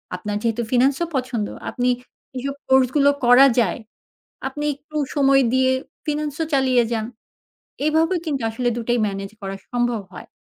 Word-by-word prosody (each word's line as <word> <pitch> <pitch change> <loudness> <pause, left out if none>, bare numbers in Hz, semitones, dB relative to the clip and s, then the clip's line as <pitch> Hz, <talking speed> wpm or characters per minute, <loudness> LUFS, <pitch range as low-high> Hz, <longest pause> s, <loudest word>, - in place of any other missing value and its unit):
আপনার 205 +3 -3
যেহেতু 230 0 0
ফিনান্স 260 +2 +4
ও - - +1
পছন্দ 250 -5 -1 0.2
আপনি 250 0 0 0.5
এসব 275 +2 -3
কোর্স 265 -1 +5
গুলো 285 -1 +5 0.2
করা 250 +3 +8
যায় 205 -3 +1 0.7
আপনি 295 +2 -5
একটু 305 +2 -12 0.2
সময় 275 -1 +4
দিয়ে 260 0 +3 0.4
ফিনান্স 300 -1 -2
ও - - +1
চালিয়ে 260 -2 +3
যান। 220 -1 -1 0.8
এভাবে 320 +3 +2
কিন্তু 285 -5 -2
আসলে 245 +2 -2
২ - - -2
টাই 240 0 +2
মেনেজ 195 0 -5
করা 195 0 -4 0.2
সম্ভব 240 -2 0
হয়। - - -10
255 Hz, 160 wpm, -22 LUFS, 235-275 Hz, 0.8 s, করা